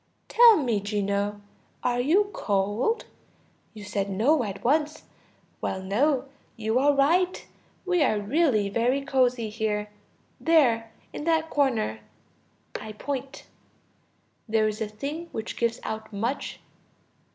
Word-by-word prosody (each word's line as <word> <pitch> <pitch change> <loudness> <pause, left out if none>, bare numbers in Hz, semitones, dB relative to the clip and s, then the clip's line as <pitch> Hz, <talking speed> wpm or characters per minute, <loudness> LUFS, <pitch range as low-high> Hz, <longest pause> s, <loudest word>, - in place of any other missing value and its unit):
Tell 465 -1 +7
me, 240 -9 0
Gino, 205 0 -2 0.4
are 245 -1 +1
you 380 +11 +2
cold? 210 - 0 0.7
You 210 - -9
said 200 -1 -2
no 240 +9 +2
at 200 -2 -6
once. 300 +4 +1 0.6
Well, 190 - -2
no, 260 +8 +1 0.3
you 220 +2 +1
are 285 +2 +4
right; 350 +7 +2 0.4
we 360 -2 +2
are 215 -7 +2
really 220 -2 +2
very 240 +7 0
cozy 250 -5 +1
here. 210 -1 -2 0.5
There, 240 -9 +3 0.2
in 295 - -6
that 320 -1 +1
corner 235 - +1 0.8
(I 215 0 -8
point) 270 +4 -5 1.0
there 220 0 +3
is 215 +1 -4
a 220 - 0
thing 285 +11 -6
which 220 - -5
gives 235 0 0
out 220 0 -5
much 230 +7 -3
235 Hz, 125 wpm, -26 LUFS, 210-290 Hz, 1.0 s, Tell